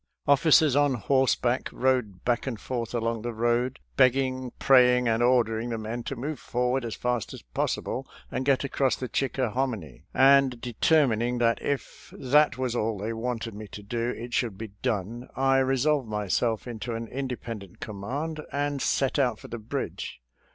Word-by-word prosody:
Officers 145 0 +5
on 145 -2 +3
horseback 130 +1 +1
rode 125 -8 0
back 120 +2 0
and 115 -5 -3
forth 120 +1 -4
along 115 -1 -1
the 120 +2 -3
road 120 +3 +1 0.2
begging, 130 -1 +2
praying, 125 -2 +5
and 115 0 +2
ordering 120 -2 +2
the 115 - -2
men 110 +2 -4
to 135 - -5
move 140 +5 -4
forward 125 +1 -1
as 115 -2 -4
fast 120 -3 -2
as - - -12
pos - - -1
sible - - -5 0.3
and 130 - -2
get 135 0 +2
across 135 -1 +1
the 130 - -5
Chickahominy, 125 - -2
and 135 -2 +5
de 120 0 -6
termining 125 -6 +3
that 115 -1 +2
if 140 -1 -4
that 150 +2 +3
was 130 -2 -1
all 110 -2 0
they 105 +4 -3
wanted 115 0 -3
me 105 +1 -8
to 105 - -10
do, 115 +3 -2
it 120 +1 -7
should 115 -5 0
be 110 +1 -6
done, 120 +1 -2
I 135 0 +3
resolved 135 0 +1
myself 105 +1 0
into 120 0 -4
an 115 0 -4
independent 120 -7 -6
command 140 +10 -4
and 145 -1 -1
set 135 +1 +1
out 125 -5 +2
for - - -12
the 120 - -5
bridge. 110 - -5
125 Hz, 170 wpm, -27 LUFS, 115-135 Hz, 0.3 s, Officers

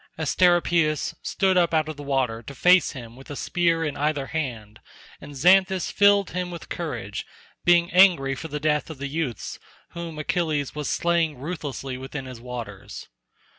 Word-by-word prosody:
Asteropaeus 165 -1 +2
stood 190 -2 +1
up 170 -2 +3
out 155 -1 +2
of 155 - -5
the 145 - -9
water 130 -5 -1
to 140 +5 -10
face 180 +4 +4
him 120 -4 -9
with 135 +4 -14
a 145 - -5
spear 165 +1 +1
in 150 - -3
either 145 -1 -1
hand, 120 -9 -5 0.4
and 145 - -10
Xanthus 185 +5 +4
filled 200 -1 +4
him 180 0 -3
with 170 -2 -9
courage, 120 - -4 0.4
being 175 0 +4
angry 180 -8 +5
for 160 - -6
the 150 -1 -4
death 150 0 0
of 160 - -7
the 140 - -5
youths 140 -5 -4 0.3
whom 170 -2 -7
Achilles 155 -3 -1
was 150 -1 -4
slaying 170 -4 +1
ruthlessly 135 -3 -5
within 135 +1 -6
his 130 -3 -9
waters. 120 -5 -8
155 Hz, 170 wpm, -24 LUFS, 135-170 Hz, 0.4 s, angry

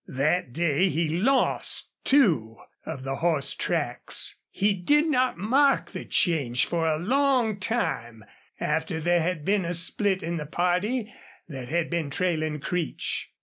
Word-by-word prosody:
That 150 0 0
day 170 +5 +1
he 165 -1 0
lost 265 +6 +1
two 155 - +3 0.3
of 130 - -6
the 135 0 -3
horse 160 -5 0
tracks. - - -1
He 205 +1 +1
did 290 - +2
not 255 - +1
mark 270 +9 +2
the - - -7
change 140 -8 +2
for 165 -1 -1
a 155 -1 +1
long 245 - +1
time 120 - -2 0.3
after 160 - -1
there 175 +2 +2
had 165 -2 -2
been 200 -1 +2
a 170 +1 -1
split 190 +3 +2
in 170 +1 -2
the 150 -2 -5
party 185 - -1 0.3
that 130 -6 -7
had 170 +2 -1
been 170 -4 -1
trailing 155 -1 -1
Creech. 170 +2 -3
175 Hz, 150 wpm, -26 LUFS, 155-205 Hz, 0.3 s, two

